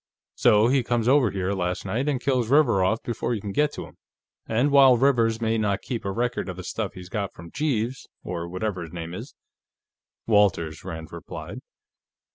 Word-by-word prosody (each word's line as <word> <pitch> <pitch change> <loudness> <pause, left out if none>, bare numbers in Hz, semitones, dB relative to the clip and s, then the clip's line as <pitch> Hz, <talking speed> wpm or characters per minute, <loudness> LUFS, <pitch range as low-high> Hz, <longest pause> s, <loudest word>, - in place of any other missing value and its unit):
So 105 +1 +4
he 130 +1 +3
comes 120 -1 -1
over 130 -3 +5
here, 95 0 -2
last 90 -1 -2
night, 120 +9 -1
and 135 -3 0
kills 125 -3 0
Rivers 135 -8 +4
off 110 +5 +1
before 120 0 -2
you - - -3
can 100 -1 -5
get 150 +8 +2
to - - -6
him. - - -17 0.5
And 120 +6 +1
while 135 -3 +7
Rivers 115 -4 +2
may 115 -1 0
not 100 -2 0
keep 120 -5 -4
a 100 - -1
record 120 0 -2
of 90 - -6
the 95 - -7
stuff 105 +3 -4
he 90 -1 -9
got 100 0 -3
from 85 0 -11
Jeeves, 135 -4 -2 0.2
or 85 0 -4
whatever 95 +1 -3
his 80 -2 -8
name 85 -1 -6
is 115 +9 -8 0.5
" - - -68
"Walters," 100 -8 +2
Rand 80 -1 -7
supplied. - - -8
110 Hz, 200 wpm, -25 LUFS, 95-125 Hz, 0.5 s, while